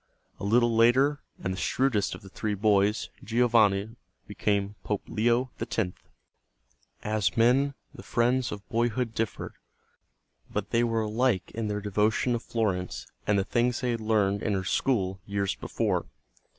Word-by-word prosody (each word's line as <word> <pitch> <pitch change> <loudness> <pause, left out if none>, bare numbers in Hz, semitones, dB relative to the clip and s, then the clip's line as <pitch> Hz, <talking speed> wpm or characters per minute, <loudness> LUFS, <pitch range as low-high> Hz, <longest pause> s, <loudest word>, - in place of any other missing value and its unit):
A - - -8
little 115 +3 +3
later, 130 +6 +4 0.2
and 95 - -1
the 95 - -5
shrewdest 125 -6 +1
of - - -13
the 95 - -11
three 105 +2 -2
boys, 105 +1 +2
Giovanni, 110 -2 +2 0.3
became 100 -1 -1
Pope 105 -2 -2
Leo 120 +3 +1
X. - - -4 1.3
As 105 -3 0
men 130 +5 +3 0.2
the - - -10
friends 125 +1 +1
of 100 0 -7
boyhood 120 0 0
differed, 115 -1 -3 1.0
but 105 -1 -3
they 115 +1 +3
were 115 -1 +1
alike 110 -2 0
in 115 -1 -3
their 105 0 -2
devotion 105 +4 +1
to 120 - 0
Florence 100 -6 -2 0.2
and 105 - +3
the 95 - +2
things 120 +4 0
they 125 -1 0
had 115 -1 -2
learned 105 -2 +1
in 105 - 0
her 95 -1 -1
school 95 -2 0
years 100 -1 -1
before. - - -2
110 Hz, 150 wpm, -28 LUFS, 100-120 Hz, 1.3 s, later